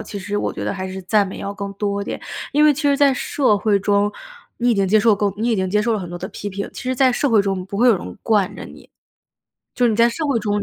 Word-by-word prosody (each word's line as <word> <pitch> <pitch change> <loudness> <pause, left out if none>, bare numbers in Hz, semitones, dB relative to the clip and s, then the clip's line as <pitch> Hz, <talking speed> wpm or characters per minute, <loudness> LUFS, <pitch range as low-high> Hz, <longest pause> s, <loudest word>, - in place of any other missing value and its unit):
其 - - -8
实 205 +2 -4
我 - - -1
觉 - - -5
得 - - -1
还 190 -1 -5
是 190 0 -7
赞 205 +2 +2
美 190 - -8
要 200 - -4
更 200 0 -6
多 200 0 -2
点。 - - -5 0.3
因 295 +2 +4
为 305 - +6
其 295 +3 -5
实 285 -1 +3
在 280 -1 +4
社 255 -4 +1
会 210 0 +2
中， 205 +1 +2 0.5
你 245 +1 +2
已 235 - +3
经 195 -1 +1
接 215 +3 +4
受 220 -1 +4
够 200 -1 -1
你 225 +3 -1
已 225 - +1
经 190 -1 -1
接 210 +3 +1
受 230 +1 +1
了 220 - 0
很 180 -3 -6
多 175 - -6
的 185 +2 -6
批 205 - -6
评， 200 0 -5
其 - - -8
实 255 0 -1
在 260 0 +4
社 280 +4 0
会 220 -4 +4
中， 195 -2 -2
不 200 - -6
会 245 +4 +4
有 225 - +5
人 90 - -9
惯 205 -4 +1
着 - - -8
你。 - - -15 0.9
就 245 - +2
你 220 - 0
在 235 +1 +4
社 315 +5 -3
会 275 -5 +1
中， 205 -1 -1
205 Hz, 320 characters per minute, -20 LUFS, 200-240 Hz, 0.9 s, 为